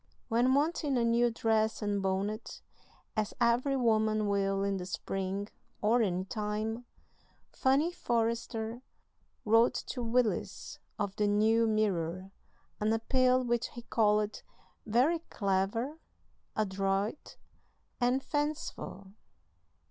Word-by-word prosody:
When 245 +3 +3
wanting 295 -2 +1
a 235 - +2
new 235 +1 +3
dress 220 -1 0
and 205 -1 0
bonnet, 195 +3 -2 0.5
as 215 -1 -1
every 245 +3 +2
woman 215 -3 +2
will 195 -1 +1
in 200 -1 0
the 180 -1 -5
spring 195 +2 -3 0.3
(or 230 +3 +3
any 185 -3 0
time), 215 +3 -3 0.7
Fanny 275 +6 +2
Forrester 230 -3 -2 0.6
wrote 225 +3 +4
to 250 - -4
Willis, 235 -1 -1 0.2
of 205 -2 -2
the 210 - +2
New 220 +2 +3
Mirror, 190 -4 0 0.5
an 210 +1 +1
appeal 255 +3 +2
which 240 -1 0
he 240 - -8
called 210 -2 +1 0.5
"very 255 +10 +3
clever, 205 +9 -1 0.6
adroit, 195 +3 -1 0.6
and 250 +2 +2
fanciful." 295 -9 -3
220 Hz, 110 wpm, -31 LUFS, 205-240 Hz, 0.7 s, wrote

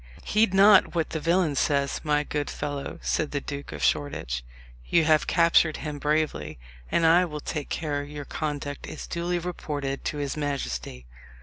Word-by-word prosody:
"Heed 215 -1 +2
not 195 -1 +6
what 165 -2 0
the 160 - -2
villain 165 0 +2
says, 140 0 +1
my 150 -1 +2
good 145 -1 -3
fellow," 145 -1 -4
said 155 - 0
the 145 - -2
Duke 140 0 -6
of - - -6
Shoreditch; 60 - 0 0.4
"you 165 - +4
have 155 -1 +3
captured 170 -2 +4
him 150 -2 -5
bravely, 150 - -1 0.3
and 165 - +3
I 170 +3 +6
will 150 -3 -6
take 150 0 -4
care 145 -3 -2
your 145 0 -7
conduct 145 -2 -4
is - - -7
duly 175 +1 -2
reported 150 -6 -4
to 150 - -2
his 140 -1 -2
majesty. 65 - -4
150 Hz, 170 wpm, -26 LUFS, 145-165 Hz, 0.4 s, not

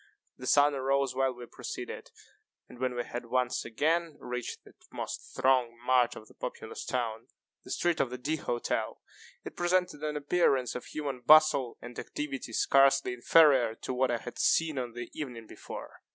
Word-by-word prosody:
The 130 - -8
sun 145 +2 +5
arose 135 0 +1
while 135 0 +1
we 120 0 -9
proceeded, - - -7 0.6
and, 120 - -14
when 130 -1 -1
we 120 - -1
had 120 0 -6
once 125 0 0
again 155 +7 0
reached 125 0 -5
that - - -17 0.2
most - - -6
thronged 125 -3 +2
mart 125 -1 +3
of 110 - -11
the - - -18
populous - - -6
town, 115 -3 -3 0.4
the - - -13
street 175 -1 0
of 130 - +1
the 125 - -5
D__ 150 +5 -2
Hotel, 120 -3 -2 0.5
it - - -7
presented 175 -3 0
an 150 -1 -2
appearance 140 -4 +2
of 125 - -6
human 140 -4 -4
bustle 140 -1 +5
and 120 0 -8
activity 135 -5 -5
scarcely 135 +1 +4
inferior 125 -2 +5
to 130 - -5
what 130 +1 +1
I 120 - +1
had 120 +1 -9
seen 160 -4 +2
on 120 -2 -4
the 120 0 -7
evening 125 -7 -6
before. - - -10
130 Hz, 175 wpm, -30 LUFS, 120-150 Hz, 0.6 s, sun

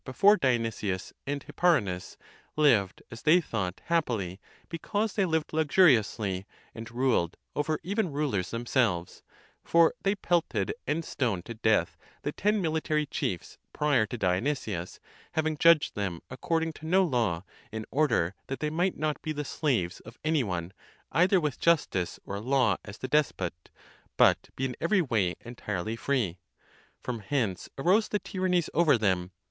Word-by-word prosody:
before 200 +11 +5
Dionysius 115 - -1
and 140 0 -2
Hipparinus, 100 - 0 0.4
lived 115 -11 +3
as 115 0 -9
they 160 +4 +5
thought 100 - -3
happily, 115 - -1 0.3
because 205 +6 -2
they 200 - +2
lived 160 -3 -1
luxuriously, 115 - +3 0.3
and 115 +1 -8
ruled 120 -8 +1 0.2
over 155 +1 0
even 195 0 -1
rulers 140 -11 -1
themselves; 115 -7 0 0.4
for 165 +3 +4
they 195 +1 +1
pelted 175 - 0
and 165 +1 -1
stoned 100 -10 -1
to 115 - -6
death® 110 -1 +1 0.3
the - - -1
ten 210 0 +1
military 155 -1 0
chiefs 90 - -4
prior 145 -7 +2
to 120 - -5
Dionysius, 95 - -1 0.3
having 160 0 0
judged 165 0 +5
them 95 -5 -3
according 165 +4 -1
to 160 - -10
no 190 +3 +4
law, 115 - 0 0.3
in 110 -1 -5
order 125 - +2
that 135 - -4
they 150 0 -1
might 175 +4 0
not 155 -1 -1
be 155 - -3
the 150 0 -4
slaves 115 - -1
of 115 - -13
any 155 -3 +2
one 90 -3 -4 0.4
either 180 +5 +4
with 150 -6 -2
justice 140 - +1
or 100 0 -4
law 125 -3 +2
as 100 +1 -9
the 130 - -5
despot, 95 - -1 0.5
but - - +4
be 135 - -1
in 125 - -3
every 180 +2 +3
way 105 - 0
entirely 110 -3 -4
free. 115 -8 -1 0.6
From 120 -2 -3
hence 105 -5 -2
arose 190 +10 +3
the 210 - 0
tyrannies 185 -4 0
over 155 -5 +4
them. 95 -5 0
130 Hz, 150 wpm, -28 LUFS, 100-160 Hz, 0.6 s, before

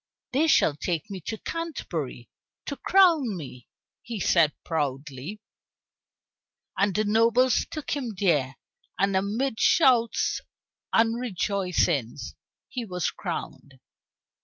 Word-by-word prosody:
"They 295 +5 +2
shall 155 - +4
take 165 +4 -3
me 190 -2 -6
to 220 - -3
Canterbury 170 - -5 0.4
to 280 - -4
crown 320 - +4
me," 130 -6 -9 0.3
he 230 -3 -6
said 170 -4 +4
proudly. 145 +3 -3 1.4
And 195 0 +1
the 215 - +2
nobles 230 +4 +3
took 310 -3 -6
him 250 -7 -3
there, 150 -9 +1 0.4
and 195 0 +1
amid 220 +6 -1
shouts 245 -7 +3 0.5
and 225 +1 +3
rejoicings 180 - -1 0.3
he 250 - -4
was 180 -6 -2
crowned. 135 -2 -6
200 Hz, 110 wpm, -26 LUFS, 155-240 Hz, 1.4 s, shall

